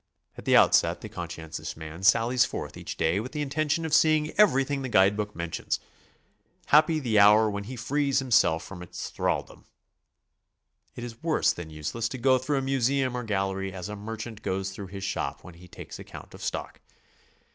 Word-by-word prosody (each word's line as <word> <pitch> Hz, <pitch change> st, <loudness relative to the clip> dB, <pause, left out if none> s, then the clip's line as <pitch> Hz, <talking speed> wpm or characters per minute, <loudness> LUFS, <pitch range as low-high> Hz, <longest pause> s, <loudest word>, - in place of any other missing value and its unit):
At -, -, -11 dB
the -, -, +5 dB
outset -, -, +4 dB
the -, -, -7 dB
conscientious 80 Hz, -1 st, -6 dB
man 80 Hz, +2 st, -8 dB
sallies 115 Hz, +5 st, +4 dB
forth -, -, -5 dB
each -, -, -7 dB
day 85 Hz, +5 st, +1 dB
with 125 Hz, +7 st, -6 dB
the 150 Hz, -1 st, -1 dB
intention 155 Hz, +3 st, -1 dB
of 160 Hz, -, -3 dB
seeing 155 Hz, -1 st, +4 dB
everything 140 Hz, -9 st, +3 dB
the 130 Hz, -, -4 dB
guide 100 Hz, -2 st, +4 dB
book 105 Hz, 0 st, -4 dB
mentions. 85 Hz, -1 st, -3 dB, 0.9 s
Happy 155 Hz, +2 st, +5 dB
the 115 Hz, -7 st, +2 dB
hour 105 Hz, +2 st, +7 dB
when 100 Hz, 0 st, -4 dB
he 130 Hz, +4 st, -7 dB
frees 140 Hz, +3 st, 0 dB
himself 115 Hz, -11 st, +3 dB
from 90 Hz, -3 st, -9 dB
its 90 Hz, -, -7 dB
thralldom! -, -, -2 dB, 1.3 s
It 120 Hz, -, -7 dB
is 115 Hz, -1 st, -8 dB
worse 160 Hz, -2 st, +2 dB
than 85 Hz, -2 st, -8 dB
useless 80 Hz, +10 st, -3 dB
to 130 Hz, -, -5 dB
go 130 Hz, +1 st, +3 dB
through 140 Hz, +3 st, -1 dB
a -, -, +1 dB
museum 135 Hz, -1 st, +1 dB
or 125 Hz, -, -3 dB
gallery 95 Hz, -2 st, -2 dB
as 90 Hz, +1 st, -6 dB
a 105 Hz, -, -5 dB
merchant 110 Hz, +1 st, -7 dB
goes 95 Hz, +1 st, -2 dB
through 95 Hz, 0 st, -8 dB
his 95 Hz, +1 st, -8 dB
shop 95 Hz, -, -3 dB
when 90 Hz, -, -11 dB
he 90 Hz, +2 st, -15 dB
takes -, -, -10 dB
account -, -, -11 dB
of -, -, -12 dB
stock. -, -, -5 dB
115 Hz, 190 wpm, -27 LUFS, 95-135 Hz, 1.3 s, hour